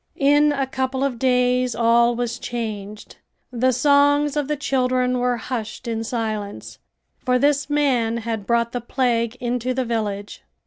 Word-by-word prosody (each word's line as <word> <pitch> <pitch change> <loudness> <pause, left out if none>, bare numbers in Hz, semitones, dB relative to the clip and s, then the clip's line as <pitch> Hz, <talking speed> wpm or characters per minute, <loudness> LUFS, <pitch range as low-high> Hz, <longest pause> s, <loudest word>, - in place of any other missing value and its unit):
In 290 +1 +4
a 275 -2 0
couple 260 0 -2
of 260 -4 -2
days 250 -1 +2
all 235 +1 +3
was 240 -1 -3
changed. 215 -3 -6 0.3
The 255 +1 +2
songs 285 +2 +3
of 295 -2 -1
the 300 - 0
children 255 -2 0
were 245 0 +1
hushed 230 -2 -5
in 225 -1 -2
silence, 215 -3 -4 0.4
for 250 0 +1
this 285 +1 +1
man 255 -6 +1
had 225 -3 -4
brought 235 0 +1
the 245 - -3
plague 240 -1 0
into 250 +1 -2
the 260 -1 -1
village. 210 -3 -3
250 Hz, 150 wpm, -22 LUFS, 230-265 Hz, 0.4 s, In